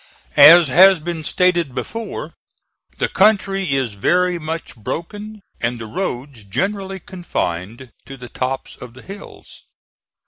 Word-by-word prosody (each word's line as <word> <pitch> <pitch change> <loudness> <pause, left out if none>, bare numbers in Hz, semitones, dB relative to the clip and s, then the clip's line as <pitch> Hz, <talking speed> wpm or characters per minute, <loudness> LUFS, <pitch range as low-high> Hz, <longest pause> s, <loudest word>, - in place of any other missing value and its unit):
As 165 +1 +9
has 185 +5 +6
been 165 0 -5
stated 170 -5 +1
before, 225 0 -6 0.6
the - - 0
country 195 -4 +2
is 130 -5 -1
very 180 - +1
much 160 +1 -6
broken 205 - -7 0.2
and 120 +1 -2
the 115 - -7
roads 130 - -5
generally 195 - -3
confined 120 - -5 0.2
to 135 - -9
the 125 -1 -10
tops 130 +2 -4
of 125 -1 -12
the 130 - -14
hills. 200 +1 -12
165 Hz, 130 wpm, -19 LUFS, 125-190 Hz, 0.6 s, As